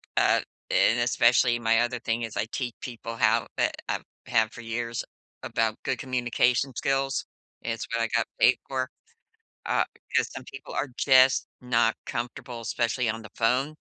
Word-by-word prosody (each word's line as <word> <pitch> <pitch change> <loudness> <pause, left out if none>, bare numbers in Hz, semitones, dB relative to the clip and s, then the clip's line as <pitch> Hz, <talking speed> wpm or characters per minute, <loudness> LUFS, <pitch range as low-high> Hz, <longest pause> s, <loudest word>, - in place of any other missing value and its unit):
uh - - +4 0.3
and, - - +4
especially 120 -1 +4
my 115 0 +3
other 120 0 -1
thing 115 +1 -1
is 110 -1 -5
I 105 - +1
teach 125 -4 -3
people 115 -2 -6
how 115 +1 +3
eh - - +3 0.2
I - - 0 0.3
have 110 -1 +2
for 120 - -10
years, 115 0 -3 0.4
about 110 -1 -1
good - - -1
communication 125 0 +1
skills, 135 0 0 0.4
it's 115 -1 -3
what 115 - +1
I 115 - +2
got - - 0
paid - - +6
for, 130 -1 -2 0.8
uh, - - +2 0.3
'cause - - +2
some 135 - -7
people 135 +1 -10
are 135 - -1
just 130 -1 +5
not 120 -2 +2
comfortable, 120 0 -5
especially 120 +1 0
on 110 +1 -2
the 110 - -11
phone. 130 +6 +1
120 Hz, 165 wpm, -27 LUFS, 115-130 Hz, 0.8 s, paid